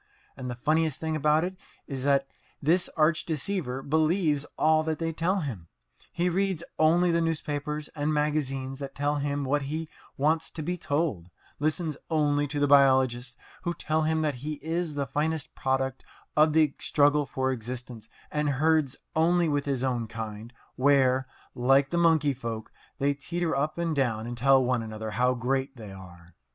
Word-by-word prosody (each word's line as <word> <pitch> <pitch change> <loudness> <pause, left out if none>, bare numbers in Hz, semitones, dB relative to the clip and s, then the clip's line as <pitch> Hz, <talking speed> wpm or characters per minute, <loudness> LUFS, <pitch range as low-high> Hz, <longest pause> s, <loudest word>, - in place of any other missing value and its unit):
And 130 -2 -6
the 120 - -4
funniest 155 +3 +1
thing 160 -1 -2
about 155 +1 +3
it 185 +1 -4 0.3
is 135 -2 -5
that 140 -1 +3 0.3
this 170 +5 +2
arch 155 +1 +3
deceiver 155 -5 -3
believes 155 -1 +1
all 155 0 +4
that 155 0 -2
they 165 -1 -2
tell 180 +4 0
him. 110 - -5 0.4
He 175 +1 0
reads 185 -1 0 0.2
only 170 +3 +4
the 170 0 +2
newspapers 150 -2 -2
and 150 0 -2
magazines 140 -3 -1
that 140 -1 -6
tell 145 +1 0
him 145 0 -1
what 145 +2 +1
he 155 +3 -4 0.3
wants 160 +3 +1
to 155 - -6
be 180 +4 -1
told, 145 - -2 0.3
listens 155 0 -1
only 145 -2 +2
to 145 +1 -3
the 145 - +3
biologists 130 -3 +4 0.2
who 175 -1 -2
tell 155 0 0
him 160 0 +1
that 150 -2 +1
he 155 +2 -3
is 160 +1 -3
the 140 -1 -1
finest 150 +2 -2
product 135 -1 -1 0.3
of 155 0 +5
the 155 -3 +4
struggle 145 0 +3
for 130 +1 -1
existence, 120 -2 -6 0.2
and 150 -1 0
herds 150 0 +2 0.2
only 170 +2 +3
with 145 -2 0
his 135 -3 -1
own 120 -3 -1
kind, 110 0 -7 0.3
where, 130 -1 +3 0.3
like 135 +2 +3
the 170 - 0
monkey 160 -4 +4
folk, 115 -3 -6 0.3
they 140 +1 +2
teeter 170 +3 -2
up 150 +4 -1
and 170 -2 -1
down 115 -5 0
and 120 +1 -5
tell 135 +2 +4
one 125 -1 +1
another 110 -1 -5
how 125 +3 +2
great 135 +3 -1
they 110 -3 -9
are. 90 -3 -13
145 Hz, 175 wpm, -27 LUFS, 130-160 Hz, 0.4 s, of